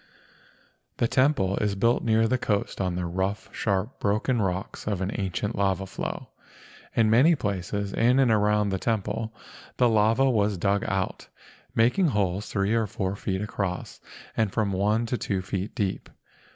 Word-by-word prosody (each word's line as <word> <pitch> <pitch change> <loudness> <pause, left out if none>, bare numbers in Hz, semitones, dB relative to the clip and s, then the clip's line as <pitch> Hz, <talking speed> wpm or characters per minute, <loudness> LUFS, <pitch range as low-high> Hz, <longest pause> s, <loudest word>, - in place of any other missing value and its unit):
The 120 - +2
temple 130 -8 +2
is 105 -2 0
built 115 +5 +2
near 115 0 +3
the 130 +2 +1
coast 100 -3 -1
on 90 -2 -1
the 90 0 -2
rough, 95 +4 -2
sharp, 100 +3 -1
broken 110 +4 +1
rocks 95 +1 -3
of 100 -4 -1
an 95 +1 -2
ancient 100 +3 -2
lava 95 -1 0
flow. 95 - -5 0.7
In 110 -2 +3
many 140 +9 +6
places 100 - -3
in 125 +3 +3
and 130 -4 +4
around 105 -1 +2
the 95 -1 -1
temple 110 +1 -2 0.5
the 125 - +4
lava 115 +4 +3
was 105 -5 +2
dug 100 +2 +1
out, 95 -1 -2 0.5
making 125 +11 +3
holes 100 - 0
three 100 +1 +1
or 115 -2 +1
four 95 0 -3
feet 95 0 -2
across 100 -3 -4 0.4
and 110 -3 +1
from 105 -1 0
one 105 +4 +1
to 120 +1 -2
two 95 -3 -2
feet 95 +3 -4
deep. 100 -6 -2
105 Hz, 165 wpm, -26 LUFS, 95-115 Hz, 0.7 s, many